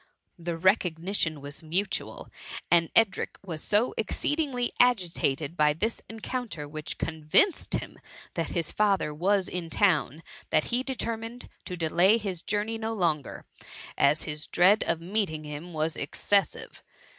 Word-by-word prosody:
The 170 0 -3
recog 180 -1 +2
nition 165 -4 -1
was 145 +1 -6
mutual, 180 +5 -2 0.4
and 170 -1 +5
Edric 225 -3 +2
was 160 -4 -5
so 215 +4 +2
exceed 290 +7 -1
ingly 255 -6 0
agitated 170 - +2
by 150 -2 +4
this 215 +9 -2
encounter, 225 - -5
which 155 0 -5
con 160 -1 -4
vinced 330 - +3
him - - -11 0.3
that 165 -3 -2
his 165 -3 -1
father 200 -7 +1
was 190 +5 +1
in 175 -2 -4
town, 165 -5 +1 0.3
that 155 - +3
he 245 - +4
determined 235 -2 -4 0.2
to 180 - -5
delay 175 +6 +4
his 195 -6 -4
journey 215 +2 -2
no 220 0 -2
longer, 165 - -1 0.5
as 145 +3 +3
his 150 0 -5
dread 190 +5 +4
of 165 - +1
meeting 175 -4 -1
him 150 +4 -7
was 155 0 -1
excessive. 195 +5 -1
180 Hz, 145 wpm, -28 LUFS, 155-215 Hz, 0.5 s, and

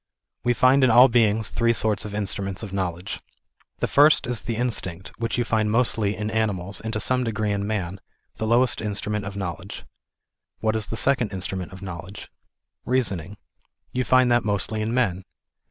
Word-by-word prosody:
We 120 0 +2
find 130 +2 +4
in 130 - +5
all 125 +3 +7
beings 110 -2 +2
three 115 0 +2
sorts 110 -2 0
of 105 -1 -6
instruments 100 -1 -2
of 100 -3 -7
knowledge. 90 -1 -3 0.6
The - - +1
first 150 +2 +5
is 120 -1 -2
the 115 - -3
instinct, 95 -7 -3
which 115 0 -2
you 120 - +2
find 110 -1 +1
mostly 110 -3 +2
irr 105 +1 -4
animals, 100 -4 -2
and 110 - -4
to 105 - -1
some 125 +3 +2
degree 110 -2 -1
in 100 0 -2
man, 95 -3 -3 0.4
the 110 - -2
lowest 120 +2 +3
instrument 105 -1 -2
of 95 0 -6
know 90 -4 -3
ledge. 95 +2 -9 0.7
What 110 0 0
is 110 -1 -1
the 115 - -4
second 125 -3 +2
instrument 95 0 -4
of 95 +1 -11
knowledge? 95 +2 -8 0.5
Reason 125 -7 0
ing. 95 +6 -11 0.5
You 125 - -1
find 130 -1 +4
that 120 0 +3
mostly 105 +1 +1
in 110 +1 -2
men. 105 -7 0
110 Hz, 185 wpm, -24 LUFS, 100-120 Hz, 0.7 s, all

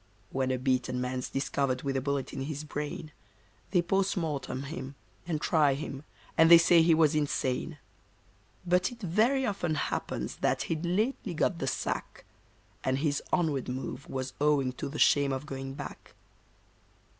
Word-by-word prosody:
When 130 -1 0
a 130 - +1
beaten 130 -1 0
man's 125 0 -2
discovered 135 -2 -1
with 135 -1 -1
a 135 - +1
bullet 140 0 -2
in 135 - -4
his 150 0 -4
brain, 150 +1 -5 0.6
They 180 -3 +3
POST 195 +3 +1
MORTEM 145 -5 -2
him, 140 -2 -6 0.3
and 160 -3 -1
try 150 -4 +3
him, 140 0 -6 0.3
and 165 0 +6
they 170 - +11
say 170 0 +6
he 165 0 +5
was 155 -2 +4
insane; 145 0 -1 0.9
But 180 +3 +2
it 240 - -11
very 230 +8 +2
often 185 -8 -1
happens - - -3
that - - +1
he'd 165 +1 -2
lately 205 0 0
got 170 +2 +1
the 135 - -2
sack, - - -3 0.6
And 130 0 +1
his 145 0 0
onward 155 -8 +1
move 130 +2 -5
was 130 -1 -4
owing 145 -3 +3
to - - -2
the 150 - -6
shame 140 -2 +4
of 135 +2 -3
going 135 -2 -6
back. 145 - -9
150 Hz, 165 wpm, -30 LUFS, 135-170 Hz, 0.9 s, they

